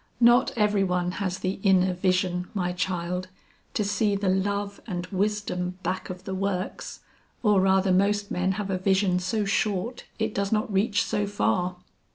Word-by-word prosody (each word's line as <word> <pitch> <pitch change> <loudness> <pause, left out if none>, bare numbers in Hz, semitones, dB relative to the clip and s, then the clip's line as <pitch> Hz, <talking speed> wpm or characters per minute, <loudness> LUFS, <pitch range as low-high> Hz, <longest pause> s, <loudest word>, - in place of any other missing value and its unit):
"Not 240 +1 +5
every 210 -2 +3
one 180 -1 0
has 185 -2 -1
the 190 +1 -3
inner 190 -2 +4
vision, 180 -1 0
my 180 -2 0
child, 180 0 -2 0.5
to 210 - +1
see 205 0 +1
the 200 -1 0
love 200 +1 -1
and 180 -3 -3
wisdom 190 -2 -1
back 185 +2 -2
of 180 0 -7
the 190 - -5
works, 190 -1 -3 0.4
or 210 -4 +4
rather 190 0 +3
most 200 +2 +2
men 185 +2 +1
have 200 -1 -3
a 185 - -1
vision 190 -1 +2
so 205 +4 -1
short 205 +3 -1
it 220 -1 -1
does 200 0 -1
not 215 0 0
reach 205 +2 +2
so 205 -1 -1
far. 185 -3 0
190 Hz, 170 wpm, -26 LUFS, 180-205 Hz, 0.5 s, Not